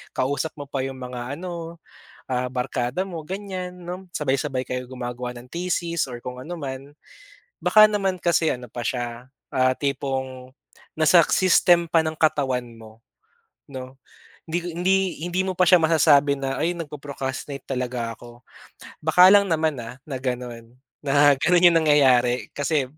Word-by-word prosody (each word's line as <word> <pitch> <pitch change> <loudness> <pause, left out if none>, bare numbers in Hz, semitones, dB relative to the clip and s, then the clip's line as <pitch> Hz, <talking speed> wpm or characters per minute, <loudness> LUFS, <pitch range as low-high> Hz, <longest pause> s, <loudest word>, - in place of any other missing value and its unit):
kausap 140 +4 -1
mo - - -4
pa 135 -2 -2
yung 135 0 -5
mga 125 +1 -6
ano, 170 -2 -7 0.5
ah, 125 0 -1
barkada 125 +6 -2
mo, 170 -4 -6
ganyan, 190 -2 -5
'no? 180 +1 -8
Sabay-sabay 135 -2 -1
kayo 125 0 -3
gumagawa 125 -1 -5
ng 120 - -12
thesis 170 -3 -1
or 120 - -7
kung 125 0 -7
anuman, 140 -4 -7 0.7
baka 215 0 +7
naman 195 -3 -1
kasi 170 -2 +2
ano 125 0 -7
pa 120 - -5
siya, 120 +1 -4 0.3
ah, 130 0 +3
tipong 130 -2 -3 0.5
nasa 165 +2 +6
system 175 -2 +4
pa 165 -1 +4
ng 155 0 -2
katawan 135 -5 +1
mo, 110 0 -15 0.7
'no? 130 -1 -8 0.5
Hindi 165 +2 -1 0.2
hindi 190 +2 +3 0.3
hindi 180 +1 -1
mo 185 - -2
pa 185 - +5
siya 180 - +7
masasabi 145 -3 +4
na, 135 0 -2
"Ay, 170 +3 0
nagpo-procrastinate 140 -3 -6
talaga 125 -3 -3
ako", 120 +1 -14 0.6
baka 180 +4 +7
lang 200 -1 +6
naman, 160 -3 +1
ah, 115 +2 -8
na 135 -3 -4
gano'n, 125 -2 -5 0.3
na 145 +1 +5
gano'n 175 +3 +4
yung 165 - +4
nangyayari, 125 -5 +3
kasi, 145 0 0
140 Hz, 150 wpm, -23 LUFS, 125-170 Hz, 0.7 s, baka